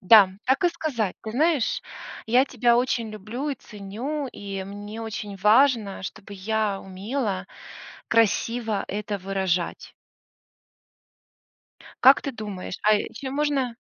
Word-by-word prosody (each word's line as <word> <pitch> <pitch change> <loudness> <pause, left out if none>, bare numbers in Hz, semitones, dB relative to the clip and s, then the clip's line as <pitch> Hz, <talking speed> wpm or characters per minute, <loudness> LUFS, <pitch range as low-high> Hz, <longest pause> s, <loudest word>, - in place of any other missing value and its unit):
Да, 200 0 +8 0.2
так 265 +7 +2
и - - +6
сказать: 275 - -2
"Ты 220 - -5
знаешь, 300 -2 +2 0.4
я 245 +4 +5
тебя 240 -3 +2
очень 240 -3 0
люблю 215 +8 -5
и 280 - -1
ценю, 235 +8 -5
и 195 -3 -6
мне 205 +3 -7
очень 210 -2 -5
важно, 215 0 +4
чтобы 200 +1 -8
я 210 0 -1
умела 195 0 -3 0.6
красиво 225 0 +2
это 205 0 -3
выражать". 190 -2 -2 2.1
Как 265 +2 +9
ты 275 - -4
думаешь? 205 -5 -6
А 215 - +5
еще 235 +5 -5
можно 275 -4 0
220 Hz, 120 wpm, -25 LUFS, 200-255 Hz, 2.1 s, Как